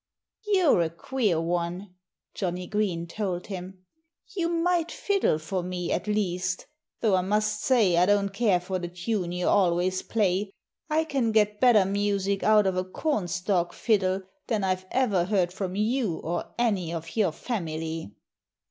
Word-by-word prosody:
"You're 370 - +4
a 165 - +1
queer 200 +1 -1
one," 175 +3 -2 0.4
Johnnie 180 -1 -3
Green 195 -5 -1
told 180 0 -3
him. 185 -1 -8 0.5
"You 340 -3 0
might 340 0 +1
fiddle 395 - +1
for 180 +4 -3
me, 180 -1 -4
at - - -1
least 185 -3 -1 0.4
though 215 -3 +3
I 185 - +2
must 210 +2 0
say 225 -9 +3
I 180 +1 +4
don't 200 -1 +3
care 200 -2 +2
for 185 +1 -3
the 175 - -4
tune 180 +1 -2
you 180 0 -2
always 185 0 +2
play. 200 -2 0 0.4
I 310 +1 +2
can 270 -7 0
get 210 -1 +2
better 235 -6 +6
music 200 0 0
out 215 -1 +5
of 190 -1 0
a 185 - +1
cornstalk 185 - -1
fiddle 195 -4 +1 0.2
than 220 -5 0
I've 185 0 -1
ever 210 -9 +2
heard 180 -3 +1
from 190 -1 -4
you 215 -4 0
or 170 +2 -3
any 200 -8 0
of 165 -1 -6
your 205 -7 +2
family." 160 - -4
190 Hz, 155 wpm, -27 LUFS, 180-215 Hz, 0.5 s, better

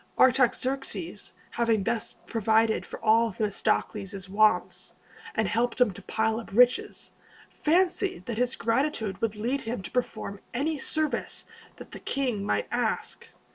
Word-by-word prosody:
Artaxerxes, 260 +5 +1 0.2
having 230 -4 +1
thus 230 +1 -2
provided 220 0 +2
for - - -8
all 225 +1 +4
Themistocles' 200 -1 -1
wants, 215 +2 +2 0.4
and 220 -2 +1
helped 235 +4 0
him 250 -4 +4
to 195 - -11
pile 220 +3 0
up 230 - -9
riches, 245 +3 +3 0.4
fancied 370 +4 +1
that 235 -2 -3
his 250 +1 +1
gratitude 230 -5 0
would 220 -2 0
lead 240 +6 -1
him 225 -3 -4
to - - -8
perform 240 -5 -3 0.2
any 300 +4 0
service 310 +1 -1 0.3
the - - -10
king 250 -7 -1
might 105 - 0
ask. - - -2
230 Hz, 135 wpm, -27 LUFS, 215-260 Hz, 0.4 s, all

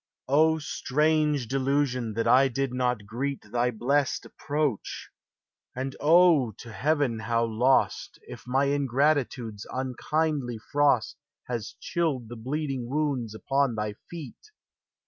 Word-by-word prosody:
O, 160 +4 +4
strange 150 -2 +1
delusion, 130 -3 0
that 115 - 0
I 135 +1 +6
did 135 0 -2
not 125 -4 0
greet 130 +6 -3
Thy 120 0 +1
blest 135 +5 0
approach! 145 -6 -3 0.6
and, 130 +1 -4
O, 155 -6 +5
to 115 +4 -11
heaven 140 -2 0
how 115 +1 0
lost, 120 +4 +1
If - - -11
my 135 +3 +2
ingratitude's 135 -5 0
unkindly 130 0 -1
frost 145 -2 +2 0.3
Has 120 -4 -5
chilled 145 -9 -1
the 120 - -7
bleeding 135 +1 -3
wounds 135 -6 -1
upon 135 +1 0
Thy 105 -1 -2 0.2
feet! 170 - -9
135 Hz, 120 wpm, -27 LUFS, 120-145 Hz, 0.6 s, I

